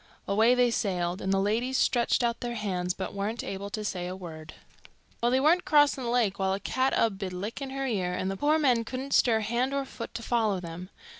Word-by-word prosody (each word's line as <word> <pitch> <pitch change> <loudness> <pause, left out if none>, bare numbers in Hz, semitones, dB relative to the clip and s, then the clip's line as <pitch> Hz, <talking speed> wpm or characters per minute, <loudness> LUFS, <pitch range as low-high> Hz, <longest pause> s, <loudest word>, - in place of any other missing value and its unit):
Away 220 +5 +4
they 245 -1 +3
sailed, 180 -4 -1
and 190 - -1
the 195 - +3
ladies 230 +6 0
stretched 240 0 +2
out 235 0 0
their 240 -1 -4
hands, 185 -4 -2
but 190 - -5
weren't 205 +4 -3
able 195 +1 -5
to 215 -1 -4
say 180 -3 -3
a 180 - -5
word. 160 -4 -9 0.7
Well, 240 - +3
they 260 +2 +3
weren't 320 +6 +4
crossing 290 -3 +4
the - - -1
lake 225 -5 +1
while 190 0 +1
a 195 - -2
cat 260 +6 0
'ud 210 -4 +1
be 195 -2 -3
lickin' 210 +9 -5
her 270 0 -3
ear, 195 -8 -1
and 185 +1 -2
the - - -3
poor 295 +9 +2
men 255 -7 +3
couldn't 260 +4 -5
stir 225 -3 +4
hand 240 +5 0
or 275 -1 -1
foot 230 -3 -8
to 230 - -5
follow 220 -5 +1
them. 175 +1 -8
220 Hz, 230 wpm, -28 LUFS, 190-250 Hz, 0.7 s, Away